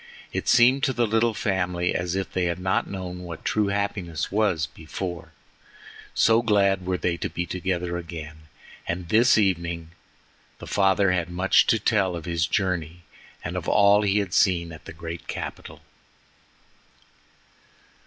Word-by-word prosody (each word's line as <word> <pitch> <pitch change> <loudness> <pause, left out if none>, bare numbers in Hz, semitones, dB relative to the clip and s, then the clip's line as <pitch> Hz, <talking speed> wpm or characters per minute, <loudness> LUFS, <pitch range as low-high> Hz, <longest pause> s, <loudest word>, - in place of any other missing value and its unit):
It - - -3
seemed 125 +3 +5
to 130 - 0
the 120 -1 +1
little 110 +1 +1
family 90 -4 -1
as 90 +1 -2
if 95 -1 -3
they 90 -1 0
had 85 0 -1
not 95 +1 -1
known 90 -2 -6
what 85 -3 -9
true 105 -1 +1
happiness 100 -5 -2
was 100 -7 +1
before, 85 +4 -7 0.8
so 115 +1 +4
glad 100 -4 +2
were 95 -1 0
they 85 -1 -1
to - - -3
be 85 - -3
together 90 -1 -2
again, 80 -2 -9 0.4
and 85 0 -4
this 115 +4 +5
evening 85 -5 0 0.7
the - - -10
father 95 -1 +2
had 85 -2 -1
much 90 +2 +3
to 115 - +4
tell 100 -5 +1
of 85 -2 -7
his 85 -2 0
journey 85 -4 -2 0.4
and - - -4
of - - -4
all 100 0 +5
he 100 -1 +1
had 100 -4 -1
seen 85 -3 +2
at 80 - -12
the - - -9
great 85 +1 -8
capital. - - -7
90 Hz, 155 wpm, -25 LUFS, 85-100 Hz, 0.8 s, seemed